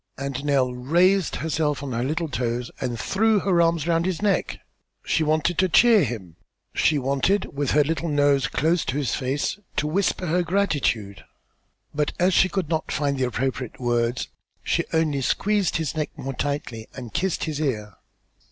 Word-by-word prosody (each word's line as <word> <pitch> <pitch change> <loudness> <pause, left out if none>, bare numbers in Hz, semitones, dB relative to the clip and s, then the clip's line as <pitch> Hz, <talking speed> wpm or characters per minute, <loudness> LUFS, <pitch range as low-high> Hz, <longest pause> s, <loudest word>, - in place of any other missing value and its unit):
And 140 0 -4
Nell 135 -3 +2
raised 175 +9 +2
herself 150 -2 -1
on 140 - -4
her 120 0 -1
little 160 +5 -1
toes 120 -3 -2
and 120 -2 -2
threw 215 - +2
her 180 -3 +3
arms 165 -2 +2
around 170 +1 +1
his 185 -3 -1
neck. 205 -1 0 0.5
She 160 - +1
wanted 155 +3 +1
to 185 0 +3
cheer 225 +4 +6
him; 100 - -5 0.4
she 155 - +2
wanted, 140 +8 0
with 145 -1 -1
her 150 +1 +5
little 165 +2 -2
nose 145 -2 +3
close 160 +6 +1
to 135 - -2
his 145 -4 -1
face, 140 +9 -2 0.2
to - - 0
whisper 185 +3 0
her 175 +2 +1
gratitude, 145 - -1 0.7
but, 150 0 -1
as 180 +1 +3
she 185 - +4
could 185 -2 -2
not 160 0 -2
find 140 -2 -1
appropriate 125 0 -2
words, 120 0 0 0.3
she - - +1
only 155 -4 +1
squeezed 205 +7 +1
his 160 -3 -2
neck 155 -1 -1
yet - - -8
more 135 - -3
tightly 125 -5 -3
and 120 -5 -8
kissed 190 0 -1
his 155 -3 -3
ear. 105 -8 -2
150 Hz, 175 wpm, -24 LUFS, 130-170 Hz, 0.7 s, cheer